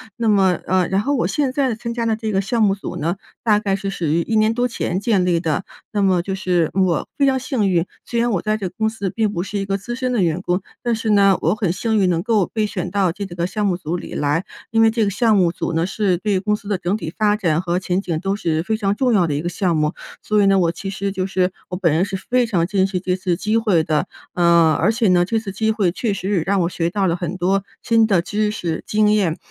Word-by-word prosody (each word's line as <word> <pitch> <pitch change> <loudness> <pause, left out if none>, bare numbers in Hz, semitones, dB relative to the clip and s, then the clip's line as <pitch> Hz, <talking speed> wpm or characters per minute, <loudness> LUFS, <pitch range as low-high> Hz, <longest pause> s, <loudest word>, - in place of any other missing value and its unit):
那 230 -2 0
么， 190 -3 +3
呃 185 -1 +2
然 190 +1 +1
后 280 +7 0
我 245 - +1
现 285 -3 0
在 260 -3 0
参 235 +1 -5
加 235 -1 -2
了 225 -1 +1
这 220 0 -3
个 195 - +1
项 220 +3 0
目 195 -2 +4
组 200 - -6
呢， 170 +5 -2 0.3
大 210 -3 +3
概 200 -2 0
是 195 0 -4
属 185 -3 -4
于 160 +3 +2
1 220 +6 0
年 215 +1 +3
多 245 +1 0
前 225 -6 -2
建 200 -4 +2
立 175 -2 +1
的。 160 +2 -1 0.3
那 205 - 0
么 185 -3 +3
就 195 - -3
是 180 -4 0
我 185 -4 +1
非 280 - +3
常 265 -1 +2
幸 240 -6 0
运， 175 -1 +2 0.2
虽 235 - -2
然 235 0 +1
我 190 - 0
在 215 0 0
这 195 -3 -3
个 - - -10
公 220 -1 +1
司 210 -3 -4
并 220 -2 0
不 175 -3 -2
是 200 +1 -4
一 195 - -2
个 195 0 -1
资 220 +5 -6
深 255 0 -2
的 240 -5 +1
员 170 +1 0
工， 180 0 -1 0.2
但 240 -1 0
是 220 0 -1
呢， 195 -2 +5
我 165 - +2
很 205 -5 0
幸 220 +4 0
运 185 - +3
能 170 -1 0
够 210 -5 +2
被 215 -2 0
选 210 - -4
到 195 -4 +1
这 200 +3 -5
个 175 -1 -3
项 210 +3 -2
目 180 - 0
组 170 -1 -4
里 180 - -7
来， 150 +4 0 0.3
因 225 0 +3
为 225 - +6
这 225 0 0
个 200 - +1
项 220 +2 +2
目 175 -3 +3
组 170 - -3
呢， 165 +1 +1
是 195 -2 0
对 195 +1 0
公 210 +2 0
司 210 - -11
的 200 -2 0
整 180 +3 -1
体 165 -5 -6
发 210 -1 +2
展 170 -6 0
和 175 -1 -1
前 180 +1 -1
景 170 -5 -2
都 195 +2 -1
是 165 -6 -1
非 220 +4 -1
常 205 -2 0
重 250 +1 +1
要 185 -5 +3
的 145 - -1
一 145 - -1
个 175 - -1
项 175 -2 0
目， 150 +1 +1 0.3
所 210 -1 +2
以 200 - +4
呢， 195 0 +4
我 170 -3 +2
其 195 +3 -6
实 195 0 -3
就 190 -1 -2
是 185 -1 0 0.2
我 180 - -4
本 170 -5 +2
人 165 +3 +2
是 195 - -4
非 245 +6 +1
常 180 -7 +1
珍 190 +1 +1
惜 190 -2 -2
这 180 0 -1
次 185 -2 -1
机 215 +4 0
会 205 -8 +2
的。 155 -1 0 0.3
呃 170 -2 +4
而 190 +7 +3
且 230 -1 +1
呢， 175 -1 +4
这 225 +4 0
次 210 -3 -6
机 220 +3 -1
会 205 -5 +1
确 215 +4 -2
实 195 -1 -1
让 195 +4 0
我 170 - +1
学 170 -2 -1
到 195 +2 0
了 170 - +1
很 175 +1 -4
多 190 +2 +1 0.2
新 225 -2 +3
的 195 -5 +3
知 210 +3 -1
识、 170 -6 -3
经 210 0 +3
验， 190 -6 +1
195 Hz, 305 characters per minute, -20 LUFS, 175-215 Hz, 0.3 s, 为